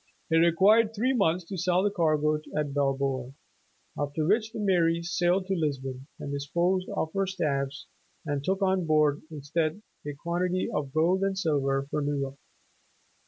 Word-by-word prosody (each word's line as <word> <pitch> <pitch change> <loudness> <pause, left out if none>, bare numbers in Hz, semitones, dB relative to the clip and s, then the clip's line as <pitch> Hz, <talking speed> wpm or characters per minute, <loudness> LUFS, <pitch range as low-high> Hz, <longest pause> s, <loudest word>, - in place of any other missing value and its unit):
It 165 - +5
required 200 +7 +4
three 250 +5 +1
months 180 -6 +1
to 190 0 -5
sell 180 +1 +2
the 205 - +2
cargo 155 -4 +1 0.2
at 150 -2 -1
Bilboa, 135 -2 -1 0.6
after 145 +1 -2
which 215 +5 +2
the 230 - -7
"Mary" 170 -4 +2
sailed 175 +2 +1
to 195 - -1
Lisbon 135 -5 -3
and 140 - -5
disposed 170 +6 0
of 160 - -2
her 195 -1 0
staves, 140 -7 -2 0.4
and 145 -2 -2
took 190 +4 0
on 190 -3 +1
board, 150 -2 +3
instead, 155 +5 -2 0.2
a 145 - -3
quantity 175 +4 -1
of 140 -3 -2
gold 170 +5 +2
and 195 0 0
silver 140 -6 +1
for 150 - 0
New 145 0 -1
York. 135 0 -4
165 Hz, 165 wpm, -28 LUFS, 145-185 Hz, 0.6 s, It